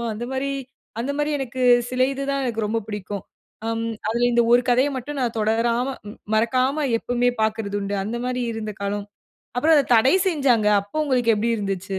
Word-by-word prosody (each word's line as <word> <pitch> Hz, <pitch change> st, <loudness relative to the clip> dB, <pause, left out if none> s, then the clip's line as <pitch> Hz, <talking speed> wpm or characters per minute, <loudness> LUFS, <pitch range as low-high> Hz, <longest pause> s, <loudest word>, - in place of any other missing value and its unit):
அந்த 235 Hz, +3 st, -4 dB
மாரி 265 Hz, +1 st, -1 dB, 0.5 s
அந்த 255 Hz, +4 st, -1 dB
மாரி 295 Hz, +1 st, 0 dB
எனக்கு 260 Hz, -1 st, -4 dB, 0.3 s
சில 255 Hz, 0 st, -1 dB
இது 275 Hz, -, -5 dB
தான் 275 Hz, -1 st, -1 dB
எனக்கு 225 Hz, -3 st, -1 dB
ரொம்ப 225 Hz, +2 st, 0 dB
பிடிக்கும். 205 Hz, -2 st, -5 dB, 0.4 s
அம் 225 Hz, 0 st, -1 dB, 0.2 s
அதில 235 Hz, +2 st, +1 dB
இந்த 235 Hz, -, +5 dB
1 245 Hz, -, +6 dB
கதையை 255 Hz, +4 st, +3 dB
மட்டும் 280 Hz, +3 st, -5 dB
நான் 235 Hz, -2 st, -1 dB
தொடராம 230 Hz, +3 st, +1 dB, 0.5 s
மறக்காம 255 Hz, +6 st, +1 dB
எப்போமே 245 Hz, +1 st, +1 dB
பார்க்கிறது 220 Hz, -2 st, -1 dB
உண்டு. 200 Hz, 0 st, -2 dB
அந்த 225 Hz, +3 st, -3 dB
மாரி 250 Hz, 0 st, -1 dB
இருந்த 215 Hz, -1 st, -5 dB
காலம். 200 Hz, 0 st, -3 dB, 0.5 s
அப்புறம் 315 Hz, +5 st, +4 dB
அத 285 Hz, -, +3 dB
தடை 255 Hz, +8 st, +4 dB
செய்ஞ்சாங்க. 260 Hz, -, +2 dB
அப்போ 200 Hz, +8 st, -11 dB
உங்களுக்கு 250 Hz, -5 st, +2 dB
எப்டி 225 Hz, +3 st, 0 dB
இருந்சிச்சு 195 Hz, -1 st, -3 dB
235 Hz, 175 wpm, -23 LUFS, 215-260 Hz, 0.5 s, 1